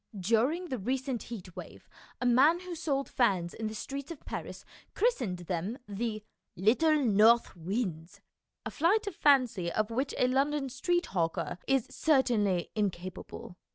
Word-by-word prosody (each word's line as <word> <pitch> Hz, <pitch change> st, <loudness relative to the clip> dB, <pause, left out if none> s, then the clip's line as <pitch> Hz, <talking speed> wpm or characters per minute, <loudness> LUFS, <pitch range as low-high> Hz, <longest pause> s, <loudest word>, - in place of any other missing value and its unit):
During 245 Hz, -, +1 dB
the 255 Hz, -, -3 dB
recent 255 Hz, +3 st, -2 dB
heat 190 Hz, -7 st, -9 dB
wave -, -, -10 dB, 0.3 s
a 245 Hz, -, -2 dB
man 280 Hz, +8 st, +5 dB
who 365 Hz, -1 st, -7 dB
sold 285 Hz, -5 st, -1 dB
fans 190 Hz, -8 st, +1 dB
in 220 Hz, -, -4 dB
the 215 Hz, -, -6 dB
streets 275 Hz, +5 st, -6 dB
of 335 Hz, -4 st, -9 dB
Paris -, -, -6 dB, 0.3 s
christened 260 Hz, -, +1 dB
them 185 Hz, +7 st, -3 dB
the 215 Hz, +1 st, -3 dB, 0.2 s
" -, -, -55 dB
little 310 Hz, +7 st, +5 dB
north 225 Hz, +2 st, +4 dB
winds," 175 Hz, -2 st, -4 dB, 0.5 s
a -, -, -4 dB
flight 395 Hz, +8 st, +2 dB
of 400 Hz, -4 st, -5 dB
fancy 245 Hz, -, +3 dB
of 215 Hz, +4 st, -1 dB
which 260 Hz, +4 st, -2 dB
a 250 Hz, -, +3 dB
London 275 Hz, +2 st, +1 dB
street 350 Hz, +8 st, 0 dB
hawker 170 Hz, 0 st, -1 dB
is 270 Hz, -3 st, +2 dB
certainly 225 Hz, -, +1 dB
incapable. 185 Hz, -3 st, -4 dB
240 Hz, 155 wpm, -30 LUFS, 195-280 Hz, 0.5 s, man